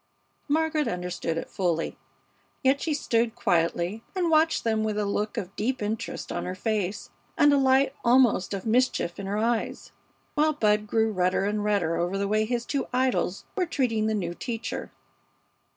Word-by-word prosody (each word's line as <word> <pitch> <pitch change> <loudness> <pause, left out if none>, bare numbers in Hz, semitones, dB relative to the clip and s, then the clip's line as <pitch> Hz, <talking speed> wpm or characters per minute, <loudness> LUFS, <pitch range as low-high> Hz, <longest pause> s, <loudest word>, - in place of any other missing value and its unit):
Margaret 310 0 +1
understood 180 -2 -3
it - - -4
fully. 170 -3 -1 0.7
Yet 270 +1 +3
she 310 -3 0
stood 230 -5 0
quietly 175 +4 0
and 350 -3 +1
watched 320 +1 +3
them 220 -1 +1
with 215 -1 -1
a 210 - 0
look 210 +3 -2
of 195 -3 -4
deep 255 +5 -1
interest 210 +1 -4
on - - -2
her 180 - -4
face 205 -1 -2 0.3
and 290 0 +6
a - - +5
light 265 0 +3
almost 235 -6 +4
of 195 - -6
mischief 225 -6 +1
in 195 - -5
her 200 +1 -1
eyes, 230 +1 -1 0.4
while 310 +1 +3
Bud 210 -6 +2
grew 220 +1 +2
redder 185 0 +1
and 210 0 -1
redder 190 -6 +1
over 175 +3 -1
the 200 0 0
way 215 +1 +2
his 240 +1 -2
two 280 +1 -2
idols 250 -7 0
were 365 -3 0
treating 230 -8 0
the 220 - +1
new 175 -4 -2
teacher. 230 +4 -5
220 Hz, 175 wpm, -26 LUFS, 195-260 Hz, 0.7 s, and